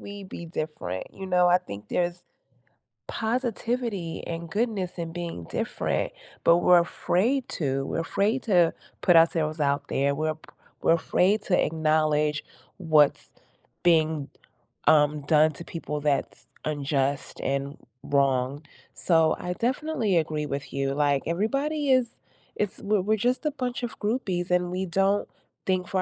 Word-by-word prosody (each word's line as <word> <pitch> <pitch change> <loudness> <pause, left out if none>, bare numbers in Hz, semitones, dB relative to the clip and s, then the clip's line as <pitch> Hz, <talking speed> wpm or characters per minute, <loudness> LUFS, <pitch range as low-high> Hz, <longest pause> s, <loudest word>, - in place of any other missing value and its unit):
we 200 -1 -8
be 170 -2 -8
different, 155 - -4
you 190 0 -7
know, 180 -1 +3
I 180 +1 +5
think 105 - -10
there's 175 0 -1 0.8
positivity 230 -6 -2
and 170 0 -5
goodness 205 -3 -1
in 165 -1 -4
being 170 - -5
different, - - -2 0.3
but 170 +1 +6
we're 175 0 +6
afraid 230 +9 0
to, 135 -3 -2
we're 165 - -2
afraid 210 +9 0
to 175 -7 +3 0.3
put 175 - +4
ourselves 160 -1 +3
out 140 0 0
there, 140 +1 +1
we're 155 +1 -1
p 155 - -19 0.3
we're 165 - +4
afraid 190 +5 +2
to 180 - +2
acknowledge 155 -1 +1 0.3
what's 155 -5 +3 0.6
being, 160 -4 +2 0.6
um, 150 -1 +4
done 155 +1 +4
to 170 - -8
people 150 -4 -5
that's 145 -2 -1 0.2
unjust 140 -2 -1
and 140 +1 -2 0.3
wrong, 140 0 +1 0.3
so 165 -2 +3
I 180 0 -3
definitely 245 - 0
agree 155 -2 -1
with 140 0 -5
you, 135 0 -1
like, 145 -1 +1
everybody 275 - 0
is 255 -2 +4 0.5
it's 205 -2 -2
we're 205 -1 +1
we're 215 +3 +1
just 250 +7 0
a - - +1
bunch 255 -2 -4
of 235 - -4
groupies, 190 -6 -1
and 180 0 +2
we 185 +1 -2
don't 195 +3 +1 0.4
think 185 -1 0
for 190 -1 0
170 Hz, 145 wpm, -26 LUFS, 150-200 Hz, 0.8 s, but